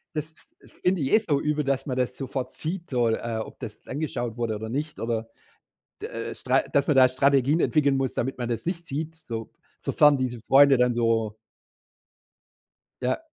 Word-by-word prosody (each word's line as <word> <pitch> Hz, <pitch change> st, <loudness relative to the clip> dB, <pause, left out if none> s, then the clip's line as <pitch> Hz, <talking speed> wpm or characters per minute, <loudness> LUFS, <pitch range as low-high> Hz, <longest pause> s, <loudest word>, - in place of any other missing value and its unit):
Das 155 Hz, +1 st, -4 dB, 0.5 s
finde 180 Hz, -2 st, +2 dB
ich 135 Hz, -, 0 dB
jetzt 215 Hz, +9 st, +3 dB
so 145 Hz, -4 st, +2 dB
übel, 150 Hz, 0 st, 0 dB
dass 135 Hz, +1 st, -1 dB
man 130 Hz, -, -2 dB
das 125 Hz, 0 st, 0 dB
sofort 130 Hz, -1 st, -4 dB
sieht, 170 Hz, +1 st, -5 dB
so, 120 Hz, -3 st, +2 dB
äh, 115 Hz, 0 st, -2 dB
ob -, -, -13 dB
das -, -, -7 dB
angeschaut 120 Hz, -5 st, -3 dB
wurde 115 Hz, -2 st, -1 dB
oder 110 Hz, +1 st, -5 dB
nicht 150 Hz, +6 st, -3 dB
oder 115 Hz, -1 st, -2 dB, 0.7 s
d -, -, -4 dB
äh -, -, -5 dB
äh, -, -, -7 dB
Stra -, -, +2 dB
dass 140 Hz, 0 st, +2 dB
man 150 Hz, -, +3 dB
da 130 Hz, -1 st, +7 dB
Strategien 140 Hz, +3 st, +3 dB
entwickeln 140 Hz, -5 st, +3 dB
muss, 135 Hz, -1 st, -1 dB
damit 130 Hz, +2 st, -2 dB
man 120 Hz, -, -3 dB
das 120 Hz, +4 st, -3 dB
nicht 170 Hz, -1 st, -3 dB
sieht, 155 Hz, +3 st, -4 dB
so 115 Hz, -8 st, -6 dB, 0.3 s
sofern 150 Hz, -1 st, +4 dB
diese 125 Hz, -2 st, -2 dB
Freunde 140 Hz, 0 st, +7 dB
dann 125 Hz, -1 st, +2 dB
so 115 Hz, -2 st, +1 dB, 1.7 s
Ja, 125 Hz, -, +1 dB
135 Hz, 190 wpm, -26 LUFS, 120-150 Hz, 1.7 s, da